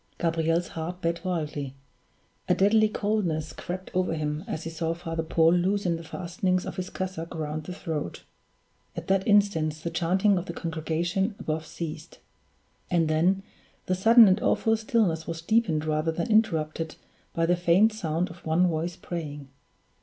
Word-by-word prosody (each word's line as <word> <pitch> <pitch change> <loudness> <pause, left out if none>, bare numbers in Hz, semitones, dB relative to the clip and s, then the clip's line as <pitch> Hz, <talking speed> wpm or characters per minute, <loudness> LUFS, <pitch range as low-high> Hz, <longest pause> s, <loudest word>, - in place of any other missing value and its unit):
Gabriel's 165 0 0
heart 170 +3 -5
beat 170 -1 -2
wildly; 150 -7 -3 0.7
a - - +5
deadly 215 +2 +4
coldness 200 -8 -1
crept 185 +1 -6
over 185 -3 +1
him 150 0 -2
as 160 - -4
he 165 - -4
saw 165 0 -2
Father 165 -1 -3
Paul 160 +1 +3
loosen 180 0 +1
the 165 - -7
fastening 185 +2 -1
of - - -6
his 185 0 -3
cassock 180 -3 -5
round 155 -1 -4
the 180 - -5
throat. 160 - -4 0.7
At - - -6
that 195 0 +2
instant 200 -7 +3
the 155 +2 -5
chanting 185 +4 +2
of 175 - -8
the 170 - -4
congregation 170 +5 -1
above 155 0 -3
ceased; 160 -1 -7 0.7
and 165 -3 +2
then 180 +5 +2 0.4
the 185 - 0
sudden 225 +4 +7
and 190 +3 +3
awful 225 0 +2
stillness 215 -8 0
was 165 -1 -5
deepened 175 -7 +2
rather 155 +1 0
than 170 +6 -3
interrupted 165 -7 +1 0.4
by 165 - +2
the 175 +1 +3
faint 180 +5 +4
sound 170 -4 -2
of 175 - -14
one 165 +3 +3
voice 170 0 -1
praying. 150 -5 -6
170 Hz, 160 wpm, -27 LUFS, 160-190 Hz, 0.7 s, sudden